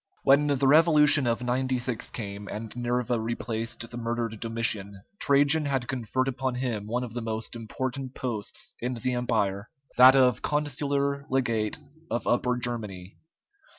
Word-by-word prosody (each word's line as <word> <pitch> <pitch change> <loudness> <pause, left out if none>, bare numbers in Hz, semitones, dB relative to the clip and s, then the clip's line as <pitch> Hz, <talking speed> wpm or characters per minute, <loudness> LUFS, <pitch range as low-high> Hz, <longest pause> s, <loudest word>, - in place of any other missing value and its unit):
When 140 +2 +5
the 140 -1 +1
revolution 150 -2 +5
of 115 +1 0
96 125 -1 -1
came, 100 -2 -6
and 110 +1 -6
Nerva 120 0 -1
replaced 115 0 -3
the 120 - -6
murdered 115 -2 -3
Domitian, 105 -4 -2 0.2
Trajan 145 +2 +4
had 135 -4 -1
conferred 130 0 -1
upon 130 -1 -2
him 120 -5 -3
one 120 +3 -1
of 120 -3 -7
the 120 - -3
most 110 +1 -4
important 130 +3 -4
posts 110 -5 -4
in 125 +1 -2
the 125 +2 -2
Empire, 110 -4 -1 0.3
that 130 +2 +9
of 125 -4 +4
consular 140 -1 -1
legate 115 -6 0 0.3
of 120 - -2
Upper 125 0 +1
Germany. 105 -6 -6
120 Hz, 145 wpm, -27 LUFS, 115-130 Hz, 0.3 s, that